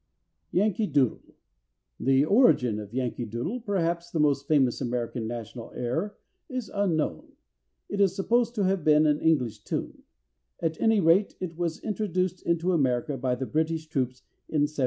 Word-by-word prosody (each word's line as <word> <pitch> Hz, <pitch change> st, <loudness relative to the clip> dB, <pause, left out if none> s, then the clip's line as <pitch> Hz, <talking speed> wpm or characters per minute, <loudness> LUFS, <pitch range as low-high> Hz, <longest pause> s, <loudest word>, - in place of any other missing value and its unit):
=Yankee 210 Hz, +2 st, +1 dB
Doodle.= 140 Hz, -6 st, 0 dB, 0.6 s
The 135 Hz, +2 st, +3 dB
origin 155 Hz, -, +4 dB
of 105 Hz, -1 st, -8 dB
Yankee 120 Hz, -1 st, -2 dB
Doodle, 120 Hz, -, -3 dB
perhaps 175 Hz, -6 st, -1 dB
the 165 Hz, -, -2 dB
most 140 Hz, -2 st, +2 dB
famous 135 Hz, -6 st, +2 dB
American 120 Hz, -2 st, -2 dB
national 115 Hz, 0 st, -7 dB
air, 160 Hz, -, -2 dB, 0.3 s
is 255 Hz, -3 st, -4 dB
unknown. 165 Hz, -, -1 dB, 0.5 s
It 200 Hz, -, -2 dB
is 190 Hz, -2 st, +3 dB
supposed 235 Hz, +4 st, +1 dB
to 205 Hz, -, +1 dB
have 190 Hz, -3 st, +1 dB
been 150 Hz, 0 st, +5 dB
an 150 Hz, -1 st, +3 dB
English 125 Hz, -9 st, +1 dB
tune. -, -, -5 dB, 0.6 s
At 160 Hz, -1 st, -2 dB
any 225 Hz, -2 st, +4 dB
rate, 180 Hz, +3 st, +3 dB
it 175 Hz, -3 st, -5 dB
was 170 Hz, -1 st, -2 dB
introduced 185 Hz, -4 st, -1 dB
into 170 Hz, +2 st, +1 dB
America 130 Hz, -3 st, +1 dB
by 130 Hz, -1 st, -1 dB
the 130 Hz, +1 st, -4 dB
British 160 Hz, +2 st, -1 dB
troops 130 Hz, -5 st, -2 dB, 0.3 s
in 150 Hz, -2 st, +2 dB
1775. 150 Hz, +1 st, -8 dB
155 Hz, 155 wpm, -27 LUFS, 125-185 Hz, 0.6 s, been